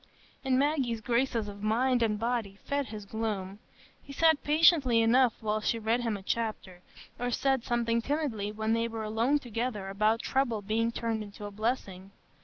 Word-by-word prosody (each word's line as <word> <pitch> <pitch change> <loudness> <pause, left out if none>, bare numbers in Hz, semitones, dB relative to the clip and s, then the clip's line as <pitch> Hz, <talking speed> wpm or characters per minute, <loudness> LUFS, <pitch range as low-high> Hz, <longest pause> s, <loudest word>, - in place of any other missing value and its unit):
And 260 -2 +2
Maggie's 270 -5 +1
graces 235 0 0
of 200 0 -9
mind 240 +4 +2
and 215 -2 +1
body 225 -3 -2
fed 280 -1 -1
his 210 -1 -8
gloom. 205 -2 -4 0.4
He 280 - -12
sat 320 +1 +3
patiently 295 -5 +4
enough 235 +1 +4
while 215 0 -1
she 230 - 0
read 225 +2 0
him 225 -3 -1
a 190 - -12
chapter, 205 -5 -3 0.4
or 245 0 -1
said 265 0 +1
something 235 -1 0
timidly 245 -7 -2
when 220 +1 -1
they 230 0 +1
were 225 -1 -5
alone 225 +7 +1
together 230 -5 -4
about 215 +4 +1
trouble 240 -6 0
being 225 +3 0
turned 230 -1 -2
into 205 0 -8
a 205 - -6
blessing. 200 -3 -3
230 Hz, 175 wpm, -29 LUFS, 215-255 Hz, 0.4 s, patiently